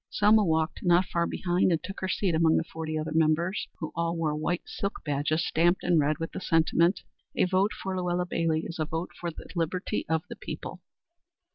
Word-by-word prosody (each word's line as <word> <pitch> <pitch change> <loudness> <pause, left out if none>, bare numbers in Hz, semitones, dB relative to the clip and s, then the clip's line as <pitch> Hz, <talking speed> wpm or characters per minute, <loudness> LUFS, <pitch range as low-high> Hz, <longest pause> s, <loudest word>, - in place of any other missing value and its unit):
Selma 210 +1 +4
walked 160 -2 0
not 175 0 +4
far 170 -1 0
behind 180 0 +1
and 165 - 0
took 195 - -6
her 190 - -2
seat 185 -2 0
among 160 0 +4
the - - +1
forty 160 -1 -5
other 155 0 -3
members, 160 +4 +1
who 155 - -5
all 170 0 -1
wore 160 -2 0
white 165 +3 -1
silk 200 - -4
badges 150 +3 0
stamped 175 +3 +2
in 175 -2 +3
red 150 +1 +2
with 165 -1 -4
the - - -6
sentiment 170 +2 +2 0.3
"A - - +3
vote 190 +3 +2
for 190 -1 -4
Luella 180 -1 0
Bailey 165 -2 0
is 170 - -7
a 155 - +1
vote 165 +3 -4
for 175 - -3
the 165 - -10
liberty 175 +1 -2
of 160 0 +1
the - - -7
people." - - -7
170 Hz, 210 wpm, -28 LUFS, 160-180 Hz, 0.3 s, Selma